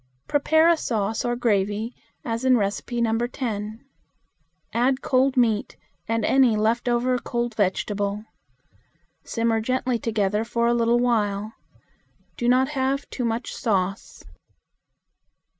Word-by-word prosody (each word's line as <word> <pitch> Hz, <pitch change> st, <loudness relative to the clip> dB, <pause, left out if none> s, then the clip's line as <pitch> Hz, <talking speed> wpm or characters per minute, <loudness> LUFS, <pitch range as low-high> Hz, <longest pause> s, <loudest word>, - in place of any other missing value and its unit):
Prepare 315 Hz, +3 st, +3 dB
a 340 Hz, -1 st, +5 dB
sauce 220 Hz, -6 st, -1 dB
or 240 Hz, 0 st, 0 dB
gravy, 215 Hz, -1 st, 0 dB, 0.3 s
as 230 Hz, +1 st, -2 dB
in 260 Hz, 0 st, +4 dB
No. 225 Hz, +2 st, 0 dB
10. 220 Hz, -2 st, -5 dB, 0.9 s
Add 255 Hz, +3 st, +1 dB
cold 265 Hz, +1 st, +2 dB
meat 225 Hz, -4 st, +1 dB, 0.3 s
and 225 Hz, -1 st, 0 dB
any 260 Hz, -4 st, +4 dB
left 225 Hz, +3 st, +1 dB
over 245 Hz, +1 st, +1 dB
cold 240 Hz, 0 st, -3 dB
vegetable. 205 Hz, +1 st, -1 dB, 1.0 s
Simmer 230 Hz, -1 st, 0 dB
gently 255 Hz, +1 st, -1 dB
together 210 Hz, -1 st, 0 dB
for 235 Hz, 0 st, -1 dB
a 235 Hz, -, +3 dB
little 235 Hz, 0 st, +2 dB
while. 215 Hz, -3 st, 0 dB, 0.8 s
Do 240 Hz, -, 0 dB
not 260 Hz, +2 st, +3 dB
have 275 Hz, -1 st, -1 dB
too 250 Hz, -, -3 dB
much 230 Hz, +1 st, -2 dB
sauce. 195 Hz, -3 st, -2 dB
235 Hz, 120 wpm, -24 LUFS, 215-250 Hz, 1.0 s, a